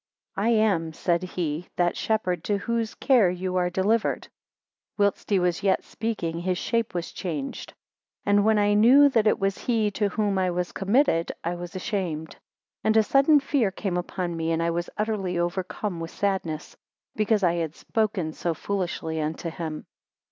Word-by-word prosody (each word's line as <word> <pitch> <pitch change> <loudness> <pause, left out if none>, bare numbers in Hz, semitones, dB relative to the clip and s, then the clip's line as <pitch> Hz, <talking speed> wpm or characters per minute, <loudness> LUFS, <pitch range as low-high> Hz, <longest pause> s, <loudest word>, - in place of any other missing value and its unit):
I 205 +4 +1
am, 200 -8 +2
said 170 +1 0
he, 175 -2 -3
that 175 -1 +1
shepherd 185 -6 -1
to 205 - +1
whose 230 +2 -2
care 245 -9 +4
you 180 +1 -3
are 180 -1 +2
delivered. 205 +5 0 0.7
4 205 - +3
Whilst 200 - -2
he 200 - +3
was 180 -1 +1
yet 195 -1 +2
speaking, 175 -8 -3
his 180 +1 -1
shape 230 -1 -1
was 175 -1 -3
changed; 155 -7 -5 0.5
and 205 0 +4
when 220 0 +4
I 205 0 +3
knew 255 +7 +7
that 225 -5 +2
it - - +4
was 195 0 -1
he 220 -4 +1
to 205 +1 0
whom 205 -2 0
I 185 -1 +1
was 180 0 -2
committed, 195 - +2
I 170 - -1
was 175 +1 -7
ashamed, 180 -6 -3 0.5
and 220 0 +3
a 220 - +6
sudden 275 +6 +5
fear 270 -6 +1
came 190 -1 -3
upon 180 -1 -3
me, 165 0 -1
and 165 0 +1
I 170 - +1
was 175 +1 -2
utterly 205 -4 -1
overcome 180 +2 -2
with 165 0 -5
sadness, 185 -7 -2 0.4
because 215 -1 +1
I 170 -2 +4
had 165 -2 -3
spoken 200 -8 -1
so 170 0 -2
foolishly 170 -4 -3
unto 160 +2 -3
him. 160 -2 -5
190 Hz, 175 wpm, -26 LUFS, 170-215 Hz, 0.7 s, knew